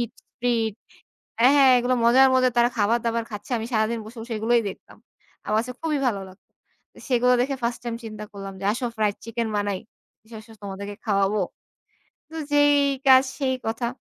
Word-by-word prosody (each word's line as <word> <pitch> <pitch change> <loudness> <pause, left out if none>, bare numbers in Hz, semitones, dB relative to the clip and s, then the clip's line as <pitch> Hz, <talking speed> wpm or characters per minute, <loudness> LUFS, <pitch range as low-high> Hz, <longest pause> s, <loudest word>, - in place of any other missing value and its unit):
eat 235 -1 -3 0.3
free 240 -1 +1 0.8
হ্যাঁ, 255 +4 +6
হ্যাঁ, 270 -2 +7
এগুলো 245 +1 +1
মজার, 260 +3 +6
মজার, 255 -1 +3
তারা 240 0 +5
খাবার-দাবার 230 +2 +1
খাচ্ছে। 210 +5 -8
আমি 225 - -4
সারাদিন 220 +1 +1
বসে 225 +2 -12 0.2
এগুলোই 230 +2 +2
দেখতাম। - - -14 0.5
আমার 215 +1 +2
কাছে 250 +2 -6
খুবই 310 -3 -1
ভালো 205 -5 0
লাগতো। 185 +2 -19 0.4
তো - - -19
সেগুলো 250 -1 +3
দেখে 275 +2 0
ফার্স্ট 235 0 -2
টাইম 235 - -3
চিন্তা 215 -1 -7
করলাম। 195 -1 -7
যে - - -6
আসো 245 +2 -3
ফ্রাইড 210 -2 0
চিকেন 230 0 -3
বানাই। 205 -2 -1 0.5
এসো, 225 +1 -15
এসো, 225 - -16
তোমাদেরকে 200 +1 -6
খাওয়াবো। 200 -1 +1 0.9
তো 320 - -13 0.2
যেই 290 0 +5 0.3
কাজ, 260 -1 +8 0.2
সেই 260 -2 0
কথা, 225 +2 -2
230 Hz, 175 wpm, -24 LUFS, 215-250 Hz, 0.9 s, কাজ